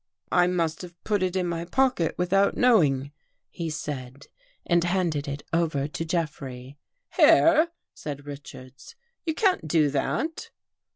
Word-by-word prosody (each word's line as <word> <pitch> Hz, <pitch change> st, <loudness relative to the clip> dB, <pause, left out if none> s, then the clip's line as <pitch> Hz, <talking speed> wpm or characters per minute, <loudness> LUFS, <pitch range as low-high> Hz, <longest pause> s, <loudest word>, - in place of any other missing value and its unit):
" -, -, -44 dB
I 175 Hz, -, +4 dB
must 165 Hz, -3 st, -1 dB
have 175 Hz, -1 st, -11 dB
put 205 Hz, -3 st, 0 dB
it 185 Hz, 0 st, -1 dB
in 185 Hz, -1 st, 0 dB
my 170 Hz, -1 st, -2 dB
pocket 250 Hz, -2 st, +1 dB
without 195 Hz, +3 st, +2 dB
know 245 Hz, -5 st, +5 dB
ing," 140 Hz, -1 st, 0 dB, 0.4 s
he 165 Hz, -2 st, -4 dB
said, 140 Hz, -3 st, -6 dB, 0.4 s
and 170 Hz, -1 st, +2 dB
handed 175 Hz, -5 st, 0 dB
it 140 Hz, +1 st, -5 dB
over 155 Hz, -4 st, +1 dB
to 155 Hz, +2 st, -5 dB
Jeffrey. 140 Hz, -5 st, -4 dB, 0.4 s
"Here!" 330 Hz, 0 st, +6 dB, 0.3 s
said 145 Hz, -1 st, -7 dB
Richards. 140 Hz, -, -11 dB, 0.3 s
"You 320 Hz, -, 0 dB
can't 370 Hz, -, +1 dB
do 155 Hz, -2 st, +3 dB
that." 315 Hz, -, -2 dB
165 Hz, 150 wpm, -26 LUFS, 145-185 Hz, 0.4 s, Here